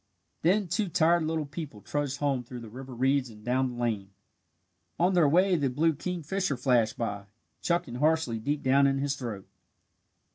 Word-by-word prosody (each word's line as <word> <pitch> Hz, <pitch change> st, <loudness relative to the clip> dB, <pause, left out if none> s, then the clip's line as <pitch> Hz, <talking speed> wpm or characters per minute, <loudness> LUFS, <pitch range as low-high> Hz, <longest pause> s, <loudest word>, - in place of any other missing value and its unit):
Then 190 Hz, +4 st, +2 dB
two 190 Hz, +3 st, -1 dB
tired 170 Hz, 0 st, +3 dB
little 160 Hz, -1 st, -1 dB
people 145 Hz, -6 st, -7 dB
trudged 145 Hz, +4 st, -2 dB
home 140 Hz, -3 st, 0 dB
through 120 Hz, 0 st, -9 dB
the 115 Hz, -2 st, -10 dB
river 130 Hz, +1 st, -9 dB
reeds 135 Hz, +1 st, +1 dB
and 105 Hz, -1 st, -14 dB
down 130 Hz, +1 st, +1 dB
the -, -, -8 dB
lane. 110 Hz, -5 st, -1 dB, 0.9 s
On 180 Hz, +3 st, +3 dB
their 170 Hz, -5 st, +4 dB
way 180 Hz, +4 st, +4 dB
the 145 Hz, -5 st, +1 dB
blue 160 Hz, +6 st, +2 dB
kingfisher 175 Hz, 0 st, -2 dB
flashed 120 Hz, -4 st, +2 dB
by, 100 Hz, -4 st, -3 dB, 0.4 s
chuckling 170 Hz, -8 st, -1 dB
harshly 150 Hz, -5 st, +1 dB
deep 145 Hz, +6 st, -2 dB
down 140 Hz, +1 st, +4 dB
in 135 Hz, 0 st, +1 dB
his 140 Hz, 0 st, -1 dB
throat. 115 Hz, -8 st, -6 dB
140 Hz, 175 wpm, -28 LUFS, 120-160 Hz, 0.9 s, their